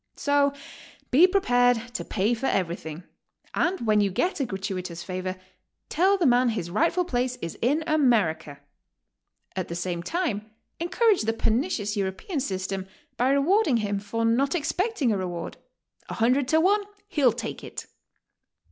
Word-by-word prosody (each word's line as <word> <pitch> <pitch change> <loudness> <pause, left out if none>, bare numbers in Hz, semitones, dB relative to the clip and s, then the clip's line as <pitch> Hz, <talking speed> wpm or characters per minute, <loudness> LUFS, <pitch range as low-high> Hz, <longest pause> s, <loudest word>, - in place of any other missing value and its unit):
So 285 -1 +2 0.6
be 310 +8 +7
prepared 245 - +2
to - - -3
pay 210 +4 0
for 240 +3 -2
eveything, 170 -3 -2 0.5
and 360 +2 0
When 215 -2 +3
you 200 - +2
get 350 - -1
a 270 - 0
gratuitous 185 -3 -4
favor, 185 0 -4 0.5
tell 380 +5 +3
the 355 - +1
man 245 -1 +4
his 175 -7 -3
rightful 335 - +2
place 250 -4 -1
is 165 -8 -6
in 290 +7 +2
America; 220 - +1 1.0
at 185 -2 -2
the 170 - -5
same 175 0 -3
time, 220 - -2 0.3
encourage 390 +5 +2
the 225 +1 0
pernicious 225 - 0
Euro 190 -1 0
pean 315 - -4
system 190 -5 -3 0.3
by 250 +2 +1
rewarding 285 - +3
him 205 -2 -1
for 230 +3 -2
not 265 +7 +2
expecting 330 - 0
a 205 - +1
reward. 175 -2 -5 0.5
A - - -4
hundred 250 +4 +2
to 315 +3 +3
one 400 +5 +3 0.3
he'll 285 - +3
take 235 - -6
it! - - -7
240 Hz, 155 wpm, -26 LUFS, 195-310 Hz, 1.0 s, be